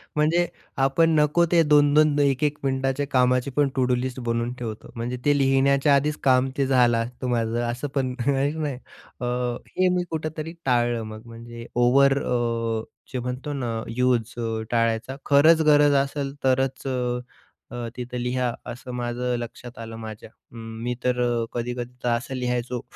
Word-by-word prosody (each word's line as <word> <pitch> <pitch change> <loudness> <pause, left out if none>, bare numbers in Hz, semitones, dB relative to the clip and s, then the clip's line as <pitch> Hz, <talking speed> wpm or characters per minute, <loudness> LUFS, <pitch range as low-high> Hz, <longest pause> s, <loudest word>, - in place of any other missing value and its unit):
म्हणजे 165 +3 +2 0.4
आपण 150 +5 +3
नको 150 +3 +3
ते 170 -1 +5
2-2 150 0 +4
1-1 145 +1 +2
मिनिटांच्या 135 +1 0
कामाची 125 +1 +3
पण 145 -2 +4
टू-डू 125 -2 +2
लिस्ट 130 +1 -3
बनवून 115 0 -1
ठेवतो. 110 -3 -6
म्हणजे 120 +2 -3
ते 145 -1 +4
लिहिण्याच्या 140 +1 +3
आधीच 150 +2 +1
काम 130 0 +4
ते 140 - +2
झालं 125 -3 +4
असतं 120 +2 -4
माझं 115 -1 0
असं 130 +5 -4
पण 130 -2 0
आहे 140 0 +2
की 160 - -7
नाही. 150 -4 -2 0.5
अ, - - -1 0.5
हे 185 0 +4
मी 180 - +1
कुठेतरी 155 0 -4
टाळलं 120 -2 +1
मग, 110 0 -8
म्हणजे 115 0 -10
ओव्हर 135 +3 +4
अ, 115 -2 -1 0.3
जे 130 - -1
म्हणतो 125 +4 -4
ना, 120 -5 -3 0.2
यूज 125 -3 +1
अ, 115 -1 -2
टाळायचा. 115 +2 0
खरंच 155 +3 +6
गरज 145 0 +5
असेल 140 0 -4
तरच 135 +1 +1
अ, 125 -1 -1 0.5
अ, 120 -1 -4
तिथे 125 0 -4
लिहा 125 -1 0 0.2
असं 125 +1 -9
माझं 125 0 -2
लक्षात 120 +1 -8
आलं 115 0 -7
माझ्या. 110 -1 -8
अ, 115 - -23
मी 115 +1 -5
तर 125 -1 +1
अ, 120 -1 +1
कधी-कधी 120 +1 -4
तर 125 - +1
असं 120 +3 -1
लिहायचो 125 -1 -2
125 Hz, 165 wpm, -24 LUFS, 120-140 Hz, 0.5 s, खरंच